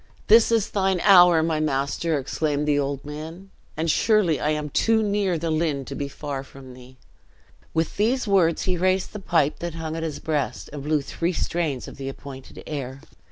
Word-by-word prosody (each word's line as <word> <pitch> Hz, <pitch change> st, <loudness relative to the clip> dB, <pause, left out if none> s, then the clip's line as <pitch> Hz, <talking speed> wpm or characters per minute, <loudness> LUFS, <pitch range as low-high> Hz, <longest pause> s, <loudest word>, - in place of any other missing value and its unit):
"This 225 Hz, +1 st, +6 dB
is 225 Hz, -3 st, +1 dB
thine 190 Hz, -2 st, +1 dB
hour, 175 Hz, -5 st, +7 dB
my 160 Hz, -1 st, 0 dB
master!" 150 Hz, +2 st, 0 dB
exclaimed 145 Hz, +2 st, -2 dB
the 145 Hz, -1 st, +3 dB
old 140 Hz, 0 st, -3 dB
man; 160 Hz, +6 st, -8 dB, 0.3 s
"and 160 Hz, -, -1 dB
surely 195 Hz, -6 st, +2 dB
I 150 Hz, -, 0 dB
am 150 Hz, -1 st, -2 dB
too 225 Hz, +6 st, +2 dB
near 200 Hz, -4 st, 0 dB
the 165 Hz, +1 st, -2 dB
Lynn 155 Hz, -4 st, -1 dB
to 140 Hz, -, -7 dB
be 140 Hz, +1 st, -3 dB
far 140 Hz, -1 st, -5 dB
from 135 Hz, -1 st, -13 dB
thee!" 130 Hz, +1 st, -15 dB, 0.8 s
With 160 Hz, 0 st, -1 dB
these 235 Hz, +4 st, +1 dB
words 180 Hz, -5 st, +3 dB
he 185 Hz, -1 st, 0 dB
raised 185 Hz, +1 st, 0 dB
the 210 Hz, -, -6 dB
pipe 165 Hz, -6 st, +1 dB
that 170 Hz, -1 st, -5 dB
hung 160 Hz, -1 st, -4 dB
at 165 Hz, -, -4 dB
his 160 Hz, -2 st, -3 dB
breast, 150 Hz, -3 st, -3 dB
and 145 Hz, -, -6 dB
blew 150 Hz, 0 st, 0 dB
three 170 Hz, +5 st, -2 dB
strains 160 Hz, -6 st, -2 dB
of -, -, -10 dB
the 135 Hz, 0 st, -5 dB
appointed 135 Hz, -1 st, -10 dB
air. 135 Hz, -3 st, -5 dB
160 Hz, 195 wpm, -24 LUFS, 140-180 Hz, 0.8 s, hour